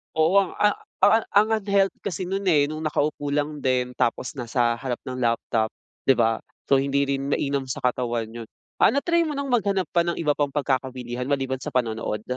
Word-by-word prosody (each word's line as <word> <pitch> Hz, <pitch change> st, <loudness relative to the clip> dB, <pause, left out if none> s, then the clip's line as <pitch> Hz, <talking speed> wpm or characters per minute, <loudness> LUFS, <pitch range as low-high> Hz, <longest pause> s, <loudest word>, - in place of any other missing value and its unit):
oo, 160 Hz, +3 st, +3 dB
ang 195 Hz, -, -2 dB
ah 210 Hz, 0 st, +3 dB, 0.3 s
ang 225 Hz, -, +7 dB, 0.4 s
ah, -, -, -1 dB
unhealthy 200 Hz, -1 st, +1 dB
kasi 190 Hz, -1 st, -3 dB
nun 195 Hz, +1 st, -2 dB
eh, 145 Hz, -5 st, +4 dB
nung 155 Hz, +1 st, -5 dB
nakaupo 150 Hz, -1 st, -1 dB
lang 150 Hz, 0 st, -1 dB
din 125 Hz, -1 st, +1 dB
tapos 120 Hz, +2 st, 0 dB
nasa 120 Hz, -1 st, 0 dB
harap 125 Hz, -3 st, -3 dB
ng 130 Hz, 0 st, -4 dB
laptop, 115 Hz, -2 st, +1 dB, 0.4 s
di 135 Hz, -, +6 dB
ba? 115 Hz, -1 st, +2 dB, 0.3 s
So 135 Hz, -1 st, +4 dB
hindi 140 Hz, +1 st, +1 dB
rin 135 Hz, 0 st, -1 dB
mainam 140 Hz, -1 st, -1 dB
sa 130 Hz, -, -5 dB
katawan 120 Hz, -2 st, 0 dB
'yun. 115 Hz, -1 st, -8 dB, 0.3 s
Ah, -, -, +6 dB
na-try 335 Hz, +3 st, +2 dB
mo 300 Hz, -, -3 dB
ng 275 Hz, -2 st, -3 dB
maghanap 200 Hz, -7 st, +1 dB
pa 170 Hz, 0 st, +2 dB
ng 170 Hz, -, 0 dB
iba 150 Hz, -3 st, +1 dB
pang 145 Hz, -1 st, 0 dB
pagkakawilihan 130 Hz, -3 st, -2 dB
maliban 135 Hz, -2 st, -1 dB
sa -, -, -8 dB
panonood? 110 Hz, -3 st, -1 dB
140 Hz, 195 wpm, -24 LUFS, 125-170 Hz, 0.4 s, ang